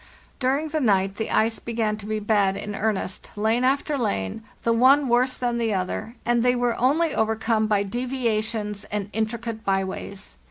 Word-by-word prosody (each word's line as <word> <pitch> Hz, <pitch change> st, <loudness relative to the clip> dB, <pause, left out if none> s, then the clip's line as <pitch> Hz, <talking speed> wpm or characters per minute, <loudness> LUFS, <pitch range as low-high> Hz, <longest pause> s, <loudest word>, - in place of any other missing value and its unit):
"During 275 Hz, +4 st, +1 dB
the 310 Hz, +1 st, -1 dB
night 195 Hz, -4 st, +2 dB
the 220 Hz, -, -2 dB
ice 225 Hz, +1 st, +1 dB
began 225 Hz, -2 st, -1 dB
to 210 Hz, -1 st, -9 dB
be 215 Hz, 0 st, -1 dB
bad 205 Hz, -2 st, +2 dB
in 210 Hz, -, -5 dB
earnest, 200 Hz, -2 st, -2 dB
lane 220 Hz, +4 st, +1 dB
after 275 Hz, +2 st, +1 dB
lane, 95 Hz, -, -2 dB, 0.2 s
the 230 Hz, -, +3 dB
one 265 Hz, +4 st, +5 dB
worse 250 Hz, +2 st, +2 dB
than 240 Hz, -1 st, -1 dB
the 225 Hz, -3 st, +1 dB
other, 210 Hz, +5 st, -3 dB
and 240 Hz, 0 st, +2 dB
they 250 Hz, +1 st, +3 dB
were 245 Hz, -1 st, +1 dB
only 300 Hz, +6 st, +2 dB
overcome 220 Hz, 0 st, +1 dB
by 205 Hz, -2 st, +2 dB
deviations 220 Hz, -3 st, -2 dB
and 205 Hz, -1 st, -4 dB
intricate 225 Hz, 0 st, -3 dB
by 195 Hz, -1 st, +1 dB
ways. 190 Hz, -, -7 dB
220 Hz, 175 wpm, -24 LUFS, 210-245 Hz, 0.2 s, one